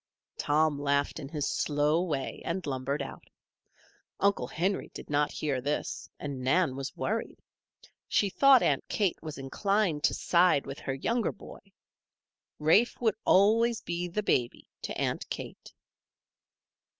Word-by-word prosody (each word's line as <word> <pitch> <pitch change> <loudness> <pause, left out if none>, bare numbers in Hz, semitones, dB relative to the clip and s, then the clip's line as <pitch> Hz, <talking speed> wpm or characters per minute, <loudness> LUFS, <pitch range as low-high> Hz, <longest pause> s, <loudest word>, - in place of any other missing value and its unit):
Tom 150 0 +2
laughed 140 +1 0
in 135 -3 -7
his 150 -2 -2
slow 150 +2 +1
way 150 -7 -3
and 175 +2 -3
lumbered 140 +1 -2
out. - - -10 0.9
Uncle 200 -10 +2
Henry 190 +8 -1
did - - -9
not 145 0 +2
hear 140 -4 -2
this, 145 +3 -3
and 140 -3 -5
Nan 135 +2 +2
was 135 0 -6
worried. 225 +2 -2 0.7
She 205 - +2
thought 270 +5 +5
Aunt 140 -2 +2
Kate 200 -5 0
was 155 -2 -7
inclined 170 +3 0
to - - +2
side 175 -5 +3
with 135 +1 -7
her 135 - -3
youngest 230 - -1
boy. - - -11 1.0
Rafe 165 +11 +3
would 225 -4 +2
always 225 +4 +4
be 175 +1 -3
"the 210 +5 -2
baby" 120 -10 0
to - - -5
Aunt - - -2
Kate. - - -7
155 Hz, 140 wpm, -29 LUFS, 140-195 Hz, 1.0 s, thought